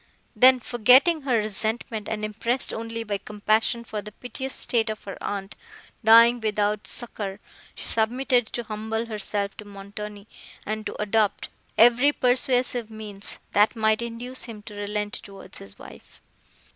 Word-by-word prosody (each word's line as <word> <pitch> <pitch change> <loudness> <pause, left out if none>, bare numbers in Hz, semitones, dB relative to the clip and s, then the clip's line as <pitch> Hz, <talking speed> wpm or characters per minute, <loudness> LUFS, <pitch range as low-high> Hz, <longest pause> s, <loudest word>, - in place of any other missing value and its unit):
Then, 255 0 +7
forgetting 255 +8 +4
her 260 -4 +1
resentment, 215 +1 -2
and 215 -1 -2
impressed 230 +4 -1
only 230 0 -4
by 205 -2 -3
compassion 215 +3 0
for 215 -2 -5
the 210 - -9
piteous 255 +4 -5
state 225 -2 +1
of 215 - -5
her 195 - -6
aunt, 200 -1 -4 0.5
dying 230 +2 +7
without 210 -1 0
succour, 205 -4 -4 0.4
she - - -6
submitted 245 +2 +1
to 240 - -4
humble 220 +1 -3
herself 210 -2 -3
to 210 - -9
Montoni, 205 +1 -9 0.4
and 215 0 -3
to - - -7
adopt 210 0 +1 0.3
every 245 +5 +6
persuasive 250 -3 +1
means, 210 -2 -4
that 210 +3 +4
might 220 0 +2
induce 235 +2 -5
him 215 -3 -9
to 210 - -9
relent 205 0 -3
towards 195 -1 -7
his 100 0 -6
wife. - - -14
220 Hz, 145 wpm, -25 LUFS, 210-240 Hz, 0.5 s, Then